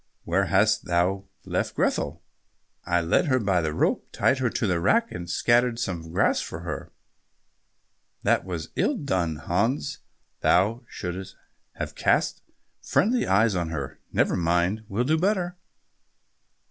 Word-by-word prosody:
"Where - - +1
hast - - +2
thou 90 +3 +1 0.2
left - - -2
Grethel?" - - -1 0.6
"I 85 0 +2
led 85 - +2
her 130 -2 +3
by 100 -7 +1
the 80 -1 -1
rope, 75 - 0
tied 130 - +2
her 125 -2 +1
to 110 - -1
the 90 -4 +1
rack, 230 - +2
and 85 0 -6
scattered 120 +3 +2
some 85 -8 -4
grass 85 - +2
for - - -6
her." - - -6 1.3
"That - - +3
was 85 -4 -5
ill 290 - +1
done, 90 - -1
Hans, 95 - -1 0.4
thou 105 +7 +2
shouldst 95 +1 -6 0.4
have - - -5
cast - - +1 0.4
friendly 235 +3 +2
eyes 105 +3 +4
on 85 -3 -1
her." 70 -4 -5
"Never - - +2
mind, 90 +5 +1
will 105 +5 0
do 155 +5 +2
better." 180 -1 0
95 Hz, 145 wpm, -26 LUFS, 85-125 Hz, 1.3 s, eyes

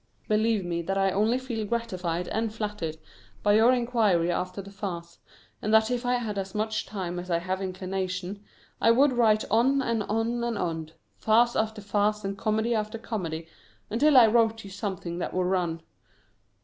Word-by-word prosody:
Believe 215 -2 +2
me 170 -1 -2
that 195 +3 -2
I 195 0 +2
only 215 +6 +2
feel 250 -4 -4
gratified 185 -6 -2
and 225 0 -1
flattered 210 -7 -4 0.5
by 205 - +4
your 225 +3 +6
inquiry 225 -9 +2
after 180 +2 -3
the 200 0 -8
farce, 175 -4 -6 0.4
and 215 - -1
that 220 +2 +4
if 245 0 -1
I 250 - +3
had 220 -5 -2
as 195 +1 -6
much 215 +1 -1
time 180 -4 -4
as 180 +1 -8
I 170 - +2
have 185 +3 -3
inclination, 185 +1 -4 0.4
I - - +5
would 265 +4 +5
write 220 -3 +3
on 255 +5 +4
and 230 -3 0
on 225 +3 -1
and 235 -2 -1
on, 160 -4 -3 0.3
farce 235 +2 +3
after 220 -1 -1
farce 210 +1 0
and 195 0 -2
comedy 220 +2 0
after 215 0 -2
comedy, 170 -8 -4 0.4
until 280 +6 +4
I 245 - +9
wrote 225 0 +2
you 195 - -10
something 190 -4 -4
that - - -4
would 185 0 +1
run. 175 -3 -1
210 Hz, 180 wpm, -27 LUFS, 185-225 Hz, 0.5 s, I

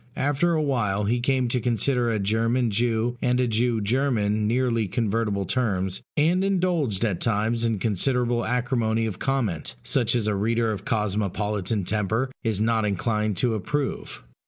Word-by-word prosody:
After 145 +5 +1
a 155 -1 +1
while 105 -8 0
he 115 +4 +1
came 130 0 +1
to 125 - 0
consider 120 +1 +1
a 110 - 0
German 115 +4 +1
Jew 115 +2 0
and 125 0 +1
a 125 - +2
Jew 115 0 +1
German 110 -3 +1
nearly 115 -2 +1
convertible 105 -1 -1
terms; 95 -6 -1 0.2
and 170 +5 +3
indulged 175 - 0
at 100 -6 -2
times 115 +1 0
in 115 -2 +1
considerable 120 +4 +1
acrimony 115 -2 0
of 105 -5 -4
comment, 110 - -2
such 125 -2 +1
as 115 -3 0
a 105 - +1
reader 115 +3 +1
of 100 -1 -5
cosmopolitan 105 -1 -1
temper 110 +6 -1
is 110 -4 0
not 110 0 +2
inclined 105 0 -1
to 120 -3 +1
approve. 135 +7 -3
115 Hz, 160 wpm, -25 LUFS, 105-125 Hz, 0.2 s, and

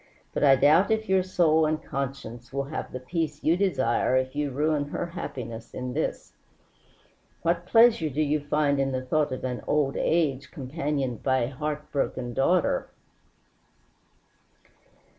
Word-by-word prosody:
But - - -1
I 135 -2 +7
doubt 150 +8 +4
if 220 0 0
your 190 0 +3
soul 160 -4 +3
and 155 0 0
conscience 125 -4 -6
will 140 0 -1
have 145 +3 -6
the 130 - -5
peace 155 +2 -3
you 160 - +4
desire 130 -10 +1
if 130 +1 -1
you 145 -1 -1
ruin 150 +2 0
her 145 - -3
happiness 120 -9 -7
in 125 0 -4
this. 155 - -3 1.1
What 170 +1 0
pleasure 225 -7 +5
do 150 +3 0
you 150 +1 +1
find 145 -1 +1
in 135 -1 0
the 130 0 -3
thought 150 +2 +1
of 130 - -5
an 125 -1 -3
old 145 -2 +1
age 140 -5 0
companioned 140 -3 -3
by 130 -1 +2
a 120 - -3
heart 150 +2 -4
broken 130 -3 -2
daughter?" 170 +7 +1
145 Hz, 155 wpm, -26 LUFS, 130-160 Hz, 1.1 s, I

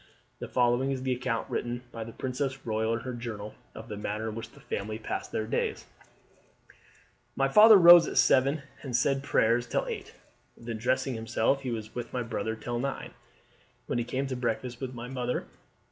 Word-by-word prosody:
The - - -5
following 125 +2 +2
is 130 -1 -2
the 130 -1 +1
account 115 -2 -2
written 120 +1 -3
by 115 -2 -5
the 115 - -8
princess 130 +3 -3
royal 110 0 0
in 115 - -2
her 130 - -5
journal 110 -3 -6 0.2
of 110 +1 -9
the 105 - -6
manner 105 +2 -3
in - - -6
which 115 +1 -6
the - - -18
family 110 +2 -4
passed 110 - -5
their 110 - -1
days: 110 - -2 1.5
"My 135 - +2
father 210 +8 +9
rose 175 -1 +9
at - - -4
seven 135 +4 +4 0.2
and 130 -4 -4
said 135 +3 +2
prayers 120 -3 +2
till - - 0
eight; - - -6 0.4
then 115 -1 -6
dressing 130 +3 0
himself 115 +4 0
he 130 - -4
was 110 -2 -5
with 120 -1 -6
my 125 - -1
brother 110 -1 -3
till 120 +1 -4
nine, 135 +2 -4 0.7
when - - -1
he - - 0
came 130 +3 -2
to 135 -1 -3
breakfast 120 0 -3
with 130 -1 -5
my 120 +1 -6
mother. 125 -1 -2
120 Hz, 190 wpm, -29 LUFS, 115-130 Hz, 1.5 s, father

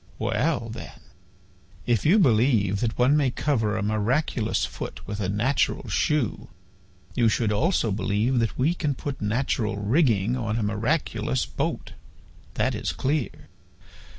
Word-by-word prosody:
"Well, - - 0
then, - - -9 0.9
if 120 +1 +1
you 190 +7 +6
believe 115 - +3
that 115 0 -1
one 125 +4 +4
may 145 -3 +3
cover 110 -5 0
a 110 - -2
miraculous 110 +3 0
foot - - -7
with 105 0 -4
a 95 -3 -1
natural 115 +8 0
shoe, 150 -7 0 0.7
you 120 -3 +3
should 110 0 0
also 115 - +1
believe 105 +5 0
that 115 -2 -1
we 145 +7 +2
can 150 -5 -2
put 140 0 -5
natural 110 0 -1
rigging 110 - +2
on 115 -3 -2
a 115 - -1
miraculous 115 +2 -1
boat. - - -4 0.6
That - - +1
is - - -3
clear. 140 -1 -2
115 Hz, 140 wpm, -25 LUFS, 105-135 Hz, 0.9 s, you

